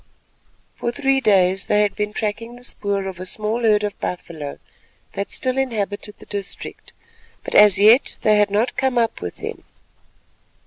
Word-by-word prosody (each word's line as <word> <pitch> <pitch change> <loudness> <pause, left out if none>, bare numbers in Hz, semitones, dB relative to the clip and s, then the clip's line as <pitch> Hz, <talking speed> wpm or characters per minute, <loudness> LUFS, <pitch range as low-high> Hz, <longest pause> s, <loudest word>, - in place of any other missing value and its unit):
For 235 - -2
three 270 +1 +1
days 190 -4 +3
they 210 0 +3
had 200 -2 -1
been 210 0 -2
tracking 220 +3 -4
the 245 - -13
spoor 200 -4 -1
of 190 -2 -6
a 185 - -5
small 215 +5 -1
herd 210 -2 +3
of 205 -1 -4
buffalo 160 -5 -5 0.6
that 200 - -4
still 255 0 0
inhabited 210 -5 -3
the - - -15
district, 200 -2 -6 0.5
but - - -6
as 210 -2 +7
yet 220 +6 +5
they 215 -1 +4
had 210 -1 +3
not 210 +5 0
come 265 -2 0
up 230 -1 0
with 90 -1 -5
them. - - -7
210 Hz, 170 wpm, -21 LUFS, 200-235 Hz, 0.6 s, as